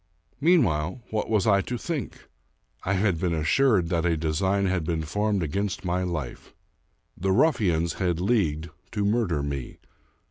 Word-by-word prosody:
Meanwhile, 120 - +2
what 110 -1 -1
was 105 -4 +2
I 100 -2 +4
to 120 +4 -4
think? 150 - -5 0.6
I 100 - 0
had 95 -3 +1
been 85 -1 0
assured 90 - +2
that 85 -2 0
a 85 -2 +1
design 95 +6 0
had 95 -3 0
been 80 -1 -1
formed 105 +4 0
against 95 +5 -2
my 90 +1 0
life. 85 -9 -5 0.6
The 95 +2 -1
ruffians 95 - +2
had 90 -3 +1
leagued 85 -6 0 0.2
to 105 -1 0
murder 100 -9 +1
me. 70 -3 -5
95 Hz, 150 wpm, -26 LUFS, 80-105 Hz, 0.6 s, I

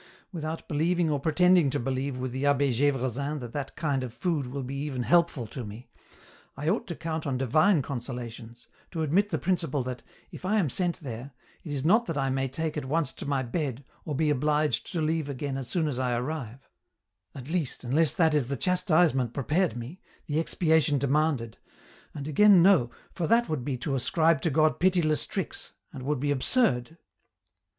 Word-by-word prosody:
Without 160 -2 -5
believing 165 +2 +1
or 145 - 0
pretending 175 +1 +4
to 145 +2 -1
believe 130 +1 -2
with 130 0 -3
the 130 +2 -4
Abbe 140 -1 +3
G^vresin 140 +2 0
that 120 -3 -8
that 140 -2 -5
kind 140 -5 -1
of 125 - -5
food 155 0 -2
will 135 +2 -5
be 130 +2 -6
even 140 -2 -3
helpful 170 -5 +2
to 120 +3 -7
me, 110 +3 -10 0.7
I 145 - -4
ought 205 - 0
to 170 - -4
count 160 -1 -4
on 130 -2 -1
Divuie 155 - +3
consolations, 120 -3 -7 0.2
to 160 -3 -3
admit 190 +8 +2
the 160 - -1
principle 165 -4 -1
that, 125 0 -5 0.3
if - - -10
I 205 +4 +1
am 165 -11 +1
sent 175 -2 -1
there, 130 -1 -7 0.3
it 155 - -7
is 140 -1 -2
not 220 +7 +4
that - - -3
I 135 -1 0
may 135 0 0
take 155 +4 -3
at 150 - -3
once 150 0 0
to - - -7
my 140 -2 0
bed, 135 0 -3 0.2
or 150 - -4
be 155 +1 +2
obliged 150 +2 +1
to 170 - -1
leave 155 -1 -1
again 140 0 -3
as 135 -2 -5
soon 160 +4 0
as 135 -4 -2
I 125 -2 0
arrive 130 -1 -5 0.3
— 95 +1 -48
at 130 -2 -8
least, 160 -7 -2
unless 145 +6 +2
that 160 -4 +3
is 145 -5 +1
the 140 +1 -3
chastisement 160 - +2
pre 140 - -2
pared 165 0 +1
me, 125 +10 -8 0.2
the 150 -1 -1
expiation 160 -3 +2
demanded, 140 -4 0 0.6
and 145 -1 -5
again 185 +4 +6
no, 180 -11 +5 0.2
for 175 -4 -2
that 235 +4 +3
would 155 -6 -2
be 130 -1 -2
to 130 +3 -3
ascribe 160 +3 +2
to 165 - +1
God 155 +1 +2
pitiless 175 -4 +2
tricks, 190 -5 -5 0.2
and 130 -3 -7
wonld 145 -1 0
be 145 0 +1
absurd 145 - +1
145 Hz, 200 wpm, -27 LUFS, 130-165 Hz, 0.7 s, again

